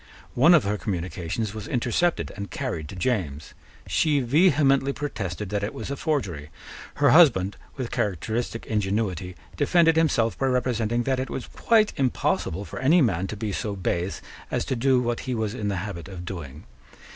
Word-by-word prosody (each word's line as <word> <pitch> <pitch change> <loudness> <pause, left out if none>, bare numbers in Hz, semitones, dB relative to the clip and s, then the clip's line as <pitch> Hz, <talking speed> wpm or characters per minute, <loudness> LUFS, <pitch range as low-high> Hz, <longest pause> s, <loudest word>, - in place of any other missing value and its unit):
One 155 +8 +6
of 155 - +4
her 105 +1 -1
communications 90 +2 -3
was 110 -2 -7
intercepted 125 +8 0
and 100 -1 -6
carried 85 - -4
to - - -8
James. 90 - -2 0.3
She 150 -3 +2
vehemently 140 0 +3
protested 105 - -4
that 105 0 -2
it 100 - -3
was 110 - -5
a - - -1
forgery. 100 - -2 0.5
Her 145 -2 +4
husband, 120 - +5 0.2
with 130 -4 -4
characteristic 110 +5 -2
ingenuity, 95 -4 -1 0.2
defended 165 +2 +3
himself 125 -8 +2
by 135 - +1
representing 120 -2 0
that 130 +1 0
it 130 - -3
was 130 - -4
quite 220 -2 +2
impossible 110 -7 0
for 90 - -7
any 150 +6 +5
man 95 -5 0
to 110 - -6
be 110 0 -3
so 100 +1 -3
base 90 0 -2 0.3
as - - -1
to 130 - -1
do 130 +1 +3
what 120 -1 -1
he 125 - 0
was 110 -2 -2
in 105 - -3
the 100 -2 -1
habit 90 -5 -7
of 90 -3 -8
doing. 80 -6 -7
110 Hz, 175 wpm, -25 LUFS, 95-135 Hz, 0.5 s, One